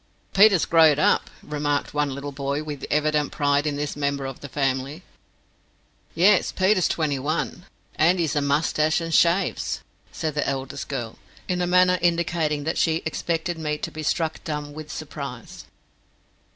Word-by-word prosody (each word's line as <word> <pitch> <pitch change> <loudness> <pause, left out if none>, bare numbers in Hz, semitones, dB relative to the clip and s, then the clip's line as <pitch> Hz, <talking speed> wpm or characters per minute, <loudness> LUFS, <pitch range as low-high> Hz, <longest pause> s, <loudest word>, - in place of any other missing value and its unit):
"Peter's 195 -3 +6
growed 160 -3 +5
up," 150 - +2
remarked 145 -1 -2
one 145 -1 +1
little 140 +1 -5
boy, 140 +1 -3
with 150 -2 -6
evident 150 -1 +1
pride 145 0 +1
in 145 - -1
this 145 0 -3
member 140 -1 -1
of 135 -1 -6
the 145 - -9
family. 135 +4 -2 1.1
"Yes; 185 +4 +4
Peter's 190 -1 +2
twenty 150 -4 -1
one, 155 +5 -3 0.3
and 175 +3 +4
hes 160 -4 0
a 145 - +2
mustatche 150 +2 +1
and 165 -1 -4
shaves," 175 +4 +2 0.3
said 155 -2 -3
the 150 -1 -1
eldest 135 -1 -4
girl, 120 -5 -5 0.3
in 180 -1 -1
a 175 - 0
manner 180 0 +4
indicating 165 -3 0
that 160 +3 -1
she 160 -1 +1
expected 165 +1 -2
me 150 -1 -2
to - - -5
be 155 - -7
struck 160 +1 -1
dumb 150 -3 -4
with 155 0 -8
surprise. - - -7
150 Hz, 160 wpm, -24 LUFS, 145-170 Hz, 1.1 s, Peter's